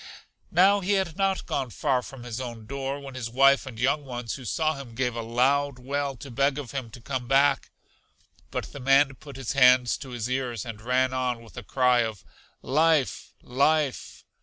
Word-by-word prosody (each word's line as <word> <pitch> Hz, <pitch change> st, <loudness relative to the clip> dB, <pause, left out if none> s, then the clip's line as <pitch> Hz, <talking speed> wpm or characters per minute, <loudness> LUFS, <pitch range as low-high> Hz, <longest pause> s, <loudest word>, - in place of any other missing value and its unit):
Now 195 Hz, +4 st, +5 dB
he 200 Hz, +1 st, 0 dB
had 190 Hz, -5 st, 0 dB
not 195 Hz, 0 st, 0 dB
gone 135 Hz, -3 st, -2 dB
far 130 Hz, +2 st, 0 dB
from 125 Hz, 0 st, -10 dB
his 120 Hz, +1 st, -5 dB
own 120 Hz, -3 st, -7 dB
door, 140 Hz, +3 st, -4 dB
when 140 Hz, -1 st, -9 dB
his 125 Hz, -3 st, -5 dB
wife 135 Hz, +3 st, +4 dB
and 120 Hz, -4 st, -8 dB
young 140 Hz, +5 st, +1 dB
ones, 120 Hz, -3 st, -5 dB
who 130 Hz, -, -8 dB
saw 155 Hz, +7 st, 0 dB
him, 135 Hz, -5 st, -10 dB
gave 125 Hz, -1 st, -1 dB
a 115 Hz, -, -3 dB
loud 130 Hz, +4 st, +1 dB
wail 140 Hz, +2 st, -3 dB
to 135 Hz, +3 st, -10 dB
beg 140 Hz, +3 st, +1 dB
of 140 Hz, -5 st, -6 dB
him 130 Hz, -4 st, -4 dB
to 115 Hz, -, -11 dB
come 130 Hz, 0 st, -4 dB
back; 140 Hz, +2 st, +3 dB, 0.8 s
but -, -, -5 dB
the 140 Hz, -, -7 dB
man 135 Hz, +1 st, +4 dB
put 140 Hz, +1 st, -12 dB
his 135 Hz, -1 st, -4 dB
hands 125 Hz, -2 st, +5 dB
to 135 Hz, -, -9 dB
his 120 Hz, -2 st, -4 dB
ears, 125 Hz, -4 st, -2 dB
and 115 Hz, -2 st, -7 dB
ran 130 Hz, +2 st, +1 dB
on 125 Hz, -2 st, -1 dB
with 115 Hz, -, -16 dB
a 120 Hz, -, -6 dB
cry 125 Hz, +2 st, +2 dB
of 110 Hz, -4 st, -2 dB, 0.4 s
Life! 155 Hz, 0 st, +1 dB
Life! 140 Hz, +2 st, 0 dB
130 Hz, 200 wpm, -26 LUFS, 120-140 Hz, 0.8 s, Now